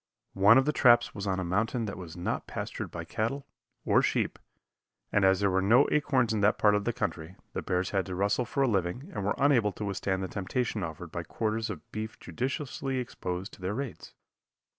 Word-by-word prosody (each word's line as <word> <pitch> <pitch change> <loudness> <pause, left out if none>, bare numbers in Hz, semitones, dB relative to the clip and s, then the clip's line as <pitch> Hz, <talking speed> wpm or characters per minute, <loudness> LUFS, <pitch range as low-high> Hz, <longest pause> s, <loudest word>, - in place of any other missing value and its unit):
One 100 +5 +7
of 135 - +4
the 150 - +1
traps 120 -3 +5
was 100 -1 -5
on 95 -1 0
a - - -1
mountain 110 +6 0
that 100 - -4
was 90 -2 -9
not 90 - -3
pastured - - -5
by - - -6
cattle, 135 +6 -2 0.4
or - - +4
sheep, - - 0 0.7
and 105 - +3
as 95 -1 +5
there 100 -1 +3
were 95 +1 +2
no 120 +8 +5
acorns 130 -6 +2
in 105 - 0
that 105 +1 +4
part 105 -1 +4
of 105 -1 0
the 120 - +2
country, 85 -5 -4 0.2
the - - -2
bears 90 0 -1
had 95 -2 0
to 90 - -4
rustle 100 +6 +1
for 140 +4 0
a - - +3
living 110 - -1
and - - -3
were 100 - 0
unable 125 -7 +3
to 105 - -5
withstand 95 -1 -1
the - - -2
temptation 110 +4 -2
offered 85 0 -6
by 85 - -3
quarters 110 +5 -2
of - - -8
beef 110 0 -5
judiciously 135 - -3
exposed 95 -6 -4
to - - -14
their 95 +3 -2
raids. 135 -1 -6
105 Hz, 215 wpm, -29 LUFS, 95-120 Hz, 0.7 s, One